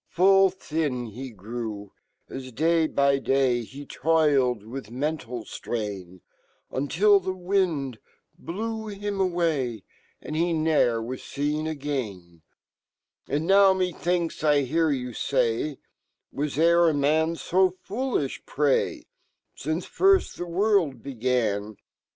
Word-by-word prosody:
" - - -47
Full 195 +2 +5
fhin 150 - -3
hegrew, 110 -3 -6 0.4
aj, 130 -3 -8
day 165 +2 +3
by 140 -2 +2
day, 130 -3 +1
Ho 140 +5 -10
toiled 140 -8 +2
wifh 115 0 -8
mental 125 -2 -3
flrain, 100 -7 -5 0.5
Until 195 +9 +3
fhe 185 0 -4
wind 175 - 0 0.4
blew 220 +4 -5
him 205 -1 -4
away, 160 - 0 0.4
And 155 - -6
he 170 +2 +1
no'er 155 -8 +2
wa$ 125 +3 -5 2.1
And 145 +4 -1
now 195 +1 +6
mefhinkj 180 -2 -1
J 145 -2 +3
hear 160 +4 +1
you 125 -3 -2 0.2
;ay, 115 -1 +2
u 145 - -10 0.5
Was 145 0 -3
ere 170 +1 +5
a 155 - 0
man 155 +3 +2
fo 185 +3 +2
fool 210 +8 -4
jfh, 135 -2 -3
pray, 145 -2 +1 0.5
Since 155 +5 -3
first 390 0 +3
fhe 175 - -5
world 185 -5 +1
began?" 115 -5 -1
150 Hz, 120 wpm, -26 LUFS, 125-175 Hz, 2.1 s, now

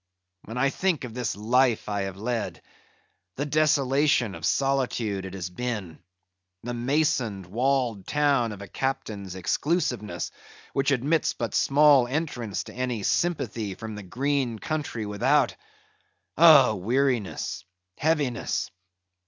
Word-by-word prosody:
When 115 +3 -7
I 135 +2 +2
think 180 -4 0
of 120 -3 -6
this 120 -3 -2
life 120 +3 +2
I 100 -1 -1
have 95 - -12
led; 115 +2 -3 0.7
the 145 - -2
desolation 140 -5 +2
of - - -3
solitude 125 -8 0
it 95 0 -7
has 90 -2 -5
been; 105 -5 -4 0.6
the 120 +1 -4
masoned, 120 - 0
walled 120 0 0
town 140 -6 +2
of 100 -1 -8
a - - -9
Captain's 100 -6 -3
exclusiveness, 105 - -1 0.4
which 135 +1 +1
admits 140 +4 +1
but 115 -3 -3
small 140 -3 +5
entrance 125 -7 -3
to - - -11
any 125 -4 -2
sympathy 115 - -1
from 110 +1 -7
the 105 - -7
green 130 +4 -1
country 145 -4 -3
without—oh, 135 +4 +2
weariness! 120 +1 -1 0.4
heaviness! 145 -6 0
125 Hz, 120 wpm, -26 LUFS, 105-140 Hz, 0.7 s, small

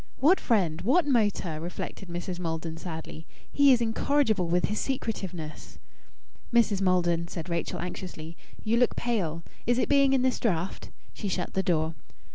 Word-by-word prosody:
"What 335 +8 +5
friend? 175 -8 +1
What 305 - +3
motor?" 205 - +1
reflected 175 +2 -6
Mrs. 175 +1 -4
Maldon 165 -1 -3
sadly. 160 -1 -7 0.2
"He 285 -1 +6
is 245 -2 +4
incorrigible 225 -4 +1
with 175 +1 +2
his 210 - -2
secretiveness." 190 - -4 0.7
"Mrs. 225 -5 +3
Maldon," 175 -2 +2
said 170 0 -6
Rachel 170 -1 -2
anxiously, 170 -2 -6 0.3
"you 225 +2 +2
look 245 0 +3
pale. 175 -9 -1 0.2
Is 240 0 +3
it - - +1
being 275 -1 +5
in 260 -2 +3
this 260 -1 +1
draught?" 185 -5 -1 0.2
She 205 - -5
shut 180 -2 -2
the 190 - +1
door. 160 -3 +1
185 Hz, 155 wpm, -28 LUFS, 170-235 Hz, 0.7 s, He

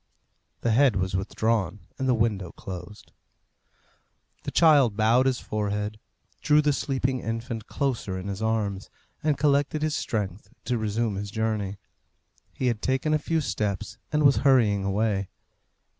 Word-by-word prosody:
The 115 - +1
head 125 +1 +4
was 95 -1 -1
withdrawn 105 0 -1 0.2
and 130 -1 0
the 125 - +4
window 105 -6 0
closed. 95 +2 -9 1.3
The - - -1
child 145 -10 +5
bowed 115 +4 +4
his 130 -2 +1
forehead, 105 0 -3 0.4
drew 150 0 +4
the 150 -1 +3
sleeping 130 -2 -1
infant 115 -1 -4
closer 120 -9 -2
in 95 +1 -6
his 100 +1 -4
arms, 105 -3 -1 0.3
and 150 -2 +1
collected 145 +1 +2
his 155 0 0
strength 100 - -3 0.2
to 125 -2 0
resume 110 -1 -1
his 100 0 -4
journey. 105 -2 -2 0.7
He 130 - -4
had 115 -4 0
taken 135 +4 0
a 155 - +3
few 160 +1 0
steps, 105 -6 -3
and 150 -1 +2
was 140 -1 +6
hurrying 115 -8 +4
away. 100 -1 0
110 Hz, 145 wpm, -26 LUFS, 100-135 Hz, 1.3 s, was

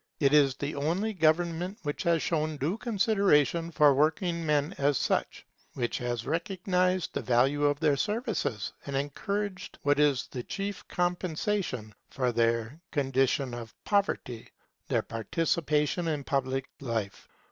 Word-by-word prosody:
It 140 -1 +3
is 140 -3 +5
the 145 +2 -4
only 175 +10 -1
government 175 +2 +1
which 145 -1 -3
has 170 -3 +2
shown 155 -2 -1
due 150 +7 -1
consideration 195 - +2
for 150 -3 +5
working 165 +4 +1
men 150 +2 +1
as 140 -1 +3
such; - - -1 0.3
which 120 -2 -1
has 120 -2 -3
recognized 180 +3 0
the - - -2
value 135 +4 +2
of 145 0 +2
their 150 -3 +3
services, 210 - -2
and 140 - -3
encouraged 190 +8 -3
what 145 0 +3
is 145 -3 +3
the 125 - -6
chief 200 - -5
compensation 175 - -1 0.2
for 125 -2 0
their 115 +5 0
condition 135 -2 +1
of 115 -2 -7
poverty, 200 - -1 0.4
their - - +1
participation 150 +6 0
in 150 -3 -1
public 135 -1 -1
life. 115 -7 -4
150 Hz, 135 wpm, -29 LUFS, 135-180 Hz, 0.4 s, is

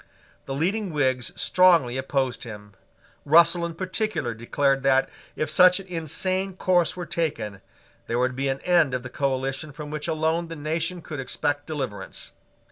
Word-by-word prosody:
The 135 - -3
leading 190 +6 -1
Whigs 130 -5 0
strongly 170 -9 +4
opposed 130 -1 -1
him: 105 -3 -9 0.5
Russell 170 +3 +5
in 165 - -8
particular 185 - -1
declared 135 +4 0
that, 135 0 +3 0.3
if 155 - -1
such 180 +5 +6
an 195 - -9
insane 185 +3 -2
course 180 -2 +2
were 175 - -4
taken, 140 - -3 0.5
there 115 - -1
would 125 +1 +1
be 135 +1 -1
an 135 0 -2
end 170 -7 +3
of 125 - -3
the 130 - -7
coalition 135 +2 -2
from 150 +1 -8
which 155 +1 -4
alone 160 +1 0
the 165 - -7
nation 165 +3 -3
could 155 -3 -6
expect 145 +2 -2
deliverance. 130 -11 -5
150 Hz, 160 wpm, -25 LUFS, 130-170 Hz, 0.5 s, such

